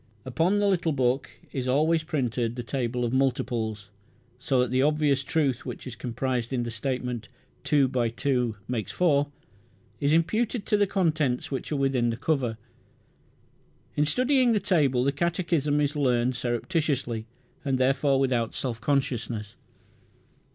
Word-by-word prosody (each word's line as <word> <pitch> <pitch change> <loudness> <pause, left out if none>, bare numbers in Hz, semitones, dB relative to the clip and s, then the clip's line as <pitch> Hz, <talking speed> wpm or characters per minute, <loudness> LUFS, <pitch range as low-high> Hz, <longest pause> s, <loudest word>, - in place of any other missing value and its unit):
Upon 165 +10 +1
the 205 0 +2
little 175 -5 +1
book 130 0 +1 0.2
is 130 -2 -3
always 155 +5 +2
printed 125 -7 -1
the 120 - -4
table 125 -1 -2
of 120 - -2
multiples, 115 -6 -1 0.5
so 135 -1 +1
that 125 -1 +1
the 130 0 +2
obvious 145 -2 +2
truth 135 -5 0
which - - -7
is 130 -3 -6
comprised 125 0 -2
in 125 -2 0
the 120 - -4
statement, 125 0 -3 0.3
"two 145 -3 +3
by 125 -2 0
two 125 -1 0
makes 115 -6 -3
four", 145 -5 +2 0.7
is 145 0 +1
imputed 215 +7 +1
to - - +2
the 205 -1 +3
contents 155 -11 0
which 135 +2 -4
are - - +1
within 135 -4 +1
the 115 - -2
cover. 125 -5 0 1.4
In 150 - +3
studying 255 - +3
the 215 - +3
table 150 - +2
the 140 - +2
catechism 165 -2 0
is 145 0 0
learned 125 -3 +2
surreptitiously, 120 -2 -1 0.4
and 135 -2 0
therefore 135 +1 +2
without 125 -4 0
self 120 -4 -3
consciousness. 115 -6 -1
135 Hz, 150 wpm, -27 LUFS, 120-155 Hz, 1.4 s, two